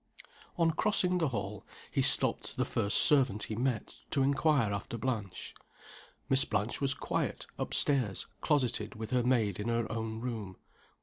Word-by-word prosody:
On 165 -1 +3
crossing 180 0 +1
the 160 - +2
hall, 105 -5 -4 0.3
he - - +1
stopped - - +3
the - - +1
first 100 - +1
servant 130 -9 +4
he 110 - -4
met, 120 -1 -2
to 135 - +1
inquire 135 -5 +2
after 100 +3 -4
Blanche. 110 -6 -4 0.7
Miss 135 0 +4
Blanche 105 +8 -2
was 135 -1 +1
quiet, - - -2
up - - -3
stairs, 125 -9 +1 0.2
closeted 125 -8 0
with 110 0 -6
her 125 -1 +2
maid 115 -6 +1
in 105 - -3
her 115 0 0
own 110 0 -3
room. 110 -6 -5
120 Hz, 160 wpm, -31 LUFS, 105-135 Hz, 0.7 s, servant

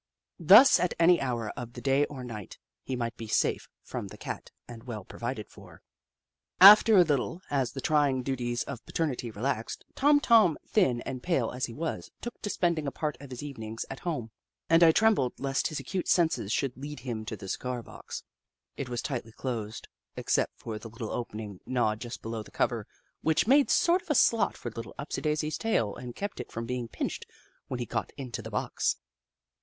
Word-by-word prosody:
Thus, 205 - +8
at 180 0 0
any 170 +1 +5
hour 120 -5 -2
of 120 -1 -8
the 120 - -8
day 135 +3 +3
or 135 -4 -8
night, 110 -6 -8 0.2
he 130 - -4
might 120 -1 -3
be 115 - -7
safe - - 0
from - - -5
the - - -11
Cat - - -6 0.2
and 120 -1 -10
well 110 -6 -6
provided 120 -3 -5
for. - - -15 0.8
After 210 +3 +10
a 180 - +9
little, 160 +3 -1
as 135 -4 0
the 135 - -5
trying 140 -3 +2
duties 120 -2 -1
of 140 -4 -7
paternity 135 -7 -2
relaxed, 115 +2 -3
Tom 290 +1 +4
Tom, 220 - +5
thin 130 - +2
and 130 -2 -5
pale 140 -9 0
as 125 +1 -2
he 115 - -9
was, 160 +2 -4
took 240 - -7
to 205 - -3
spending 170 -6 0
a - - -1
part 150 0 -2
of 140 - -10
his 125 +1 -7
evenings 115 -6 -6
at 135 - -6
home, 135 -11 -3 0.4
and 165 +1 +6
I 165 -1 +8
trembled 200 - +2
lest 135 0 0
his 155 - -4
acute 190 -2 -3
senses 165 - +2
should 135 +1 0
lead 145 0 -7
him 120 -4 -4
to 110 -1 -5
the 95 - -9
cigar 125 +4 -3
box. - - -9 0.5
It 135 - -4
was 120 -1 -3
tightly 120 -5 -4
closed, 115 -4 -5 0.3
except - - 0
for 110 -2 -6
the 115 - -9
little 110 0 -6
opening 105 -5 -5
gnawed 110 -4 +1
just 120 -1 -7
below 115 0 -4
the 105 - -12
cover, - - -1 0.3
which 160 -1 +2
made 275 +4 +5
sort 350 +2 +4
of 350 - -22
a 300 - +2
slot 230 -2 +3
for 120 - -6
Little 115 +1 -8
Upsidaisi's 150 +1 -2
tail 115 - 0
and 125 -1 -8
kept 205 +1 -5
it - - -7
from 115 +1 -4
being 125 0 -3
pinched - - -4 0.4
when 125 - -4
he 120 - -2
got - - -3
into 130 -4 -5
the - - -8
box. - - -1
130 Hz, 200 wpm, -29 LUFS, 115-160 Hz, 0.8 s, After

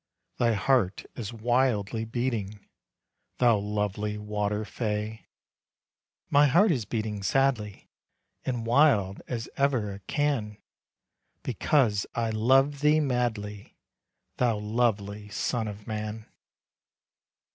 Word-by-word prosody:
Thy 120 -1 +3
heart 105 -2 +1
is 115 -4 -5
wildly 115 -2 0
beating, 115 -4 -3 0.7
Thou 120 -4 +4
lovely 105 0 -2
water 105 0 -2
fay. 105 0 -3 1.0
"My 145 +1 +6
heart 175 +9 +5
is 125 -9 -1
beating 110 -1 -3
sadly 110 -3 0 0.6
And 120 -3 -2
wild 115 -7 +3
as 115 -2 -4
ever 125 -8 +1
it 95 0 -12
can, 130 -8 -1 0.9
Because 115 -9 +1
I 115 -1 0
love 135 +6 +3
thee 150 +2 +4
madly, 115 -7 -2 0.6
Thou 120 -4 +2
lovely 105 -2 -1
son 115 +2 -1
of 105 0 -8
man." 110 0 -5
110 Hz, 105 wpm, -27 LUFS, 105-125 Hz, 1.0 s, My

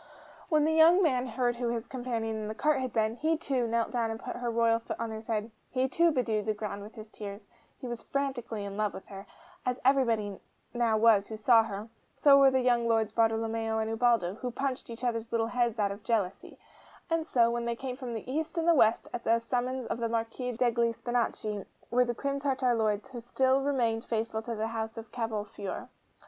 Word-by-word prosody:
When 305 -3 +3
the 315 - +2
young 330 +4 +6
man 255 -5 +2
heard 240 0 0
who 240 0 -1
his 235 0 -2
companion 235 -3 -3
in 215 -1 -4
the 215 - -5
cart 300 +2 +2
had 255 -2 -3
been, 220 0 0
he 320 +3 +1
too 265 -6 -1
knelt 230 0 0
down 235 -2 0
and 225 0 -4
put - - -6
her 245 -1 -3
royal 230 0 +3
foot 230 - -6
on 230 -1 -3
his 220 0 -7
head; 220 -1 -2 0.2
he 255 0 +1
too 335 +6 +3
bedewed 225 -7 0
the 215 - +1
ground 205 -1 -5
with 210 +3 -11
his 220 -1 -9
tears; 200 0 -8 0.3
he - - -9
was 240 -1 -5
frantically 240 -7 -3
in 200 0 -6
love 210 -1 0
with - - -9
her, 195 0 -9 0.4
as 250 0 -1
everybody 230 -7 +2 0.3
now 235 -2 +2
was 215 -3 +5
who 220 - -6
saw 225 +1 +6
her: 210 0 -6 0.3
so 285 -2 +6
were 275 -1 +7
the 260 -1 +2
young 240 -2 +2
Lords 225 -2 +2
Bartolomeo 225 0 +1
and 220 0 -1
Ubaldo, 225 -6 +2
who 250 +4 -5
punched 255 +1 -3
each 230 +1 -8
other's 230 -2 -2
little 230 -1 +1
heads 240 -1 0
out 205 -2 +1
of 200 +2 -7
jealousy; 205 -5 -2 0.5
and 330 -2 0
so, 235 -5 +3
when 235 0 -2
they 235 0 -1
came 255 +1 -5
from 250 -3 -5
east 300 +9 -4
and 335 0 +4
west 225 -5 +3
at 235 - -4
the 230 +1 +4
summons 250 +2 -2
of 230 - -3
the 230 -1 -1
Marquis 230 +2 -2
degli 235 -1 +1
Spinachi, 220 -4 -2 0.3
were 250 +1 +4
the 240 0 -2
Crim 280 +3 -2
Tartar 265 -3 +1
Lords 215 +1 0
who 250 -2 -7
still 260 +3 +2
remained 240 -5 0
faithful 220 -1 -2
to 230 +1 -4
the 220 +1 -2
House 225 0 -4
of 225 0 -8
Cavolfiore. 210 -4 -4
230 Hz, 215 wpm, -30 LUFS, 220-255 Hz, 0.5 s, were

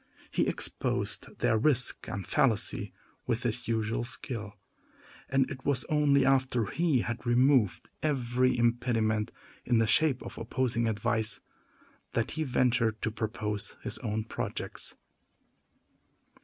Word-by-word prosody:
He - - +1
exposed - - -1
their 110 - +3
risk 125 -1 +1
and 100 -3 -4
fallacy 110 -1 +1 0.4
with - - 0
his - - -2
usual 115 0 0
skill; 115 -4 -6 0.7
and 135 -1 +3
it 130 -2 -7
was 140 -3 +1
only 145 -2 +4
after 130 -4 +2
he 155 - +1
had 120 0 -4
removed 120 - +3
every 130 -4 +1
impediment, 115 -2 +1 0.3
in 120 - +2
the 115 - +4
shape 130 +4 +4
of - - -8
opposing 115 0 0
advice, 110 0 0 0.7
that - - 0
he 155 - -1
ventured 125 -4 +2
to 110 - 0
propose 105 -1 -3
his - - -2
own 110 0 -2
projects. 115 - -4
120 Hz, 125 wpm, -30 LUFS, 110-130 Hz, 0.7 s, only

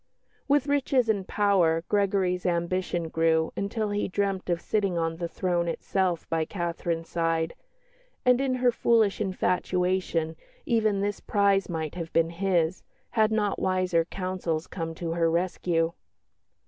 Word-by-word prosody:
With 285 -1 +3
riches 275 -4 +1
and 200 -4 0
power, 180 -6 +2
Gregory's 195 -3 +1
ambition 175 0 -1
grew 160 0 +2
until 205 +1 -2
he 205 0 0
dreamt 195 -1 -1
of 170 -1 +1
sitting 195 -2 0
on 165 0 -1
the 170 0 -3
throne 175 -1 -1
itself 180 0 -1
by 165 -1 0
Catherine's 170 -1 -3
side; 165 -1 0 0.7
and 250 +1 +5
in 265 -2 +1
her 250 -1 +3
foolish 225 -3 +2
infatuation 180 -3 0 0.3
even 215 -4 +2
this 205 0 -1
prize 200 -2 +2
might 160 -3 -3
have 165 -2 -6
been 165 0 +2
his, 175 -1 0 0.3
had 220 -2 +3
not 210 -2 0
wiser 185 -3 +1
counsels 180 -3 -3
come 165 -3 -5
to 165 0 -4
her 165 0 +2
rescue. 170 -1 0
180 Hz, 140 wpm, -27 LUFS, 165-200 Hz, 0.7 s, and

